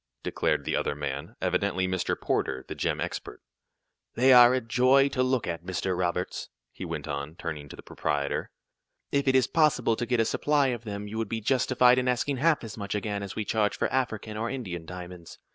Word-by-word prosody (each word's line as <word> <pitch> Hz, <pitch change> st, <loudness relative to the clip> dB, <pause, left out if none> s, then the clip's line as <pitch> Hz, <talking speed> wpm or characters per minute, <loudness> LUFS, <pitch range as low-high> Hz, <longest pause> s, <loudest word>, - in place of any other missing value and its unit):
declared -, -, 0 dB
the -, -, 0 dB
other -, -, -1 dB
man, 70 Hz, -1 st, -5 dB
evidently 95 Hz, -2 st, +1 dB
Mr. 95 Hz, -1 st, -1 dB
Porter, 65 Hz, 0 st, -1 dB
the -, -, -5 dB
gem -, -, -1 dB
expert. -, -, -5 dB, 0.8 s
"They 130 Hz, +2 st, +6 dB
are 120 Hz, -1 st, +9 dB
a 130 Hz, -, +2 dB
joy 130 Hz, +4 st, +4 dB
to 130 Hz, -, -1 dB
look 130 Hz, -2 st, +1 dB
at, 85 Hz, -1 st, -4 dB
Mr. 95 Hz, 0 st, -2 dB
Roberts," 90 Hz, 0 st, -2 dB, 0.2 s
he -, -, -9 dB
went -, -, -5 dB
on, 70 Hz, +1 st, -4 dB
turning 75 Hz, -5 st, -6 dB
to -, -, -9 dB
the -, -, -12 dB
proprietor. 70 Hz, -1 st, -2 dB, 0.6 s
"If 140 Hz, 0 st, +1 dB
it 130 Hz, -, +4 dB
is 130 Hz, -2 st, +5 dB
possible 150 Hz, -6 st, +2 dB
to 120 Hz, -, -3 dB
get 125 Hz, -1 st, +1 dB
a 115 Hz, -, +3 dB
supply 145 Hz, +2 st, +2 dB
of 120 Hz, -2 st, -4 dB
them 100 Hz, -1 st, -5 dB
you 110 Hz, +2 st, -5 dB
would 110 Hz, -3 st, -2 dB
be 115 Hz, -, -2 dB
justified 125 Hz, +1 st, +3 dB
in 125 Hz, -, -1 dB
asking 125 Hz, +2 st, 0 dB
half 155 Hz, +1 st, +2 dB
as 115 Hz, -2 st, -8 dB
much 100 Hz, -1 st, -4 dB
again 105 Hz, -1 st, -2 dB
as 100 Hz, -2 st, -6 dB
we 110 Hz, -, -2 dB
charge 105 Hz, -1 st, 0 dB
for -, -, -1 dB
African 110 Hz, -4 st, -2 dB
or 115 Hz, +2 st, -2 dB
Indian 95 Hz, -11 st, -5 dB
diamonds. 90 Hz, -1 st, -9 dB
110 Hz, 210 wpm, -27 LUFS, 90-130 Hz, 0.8 s, are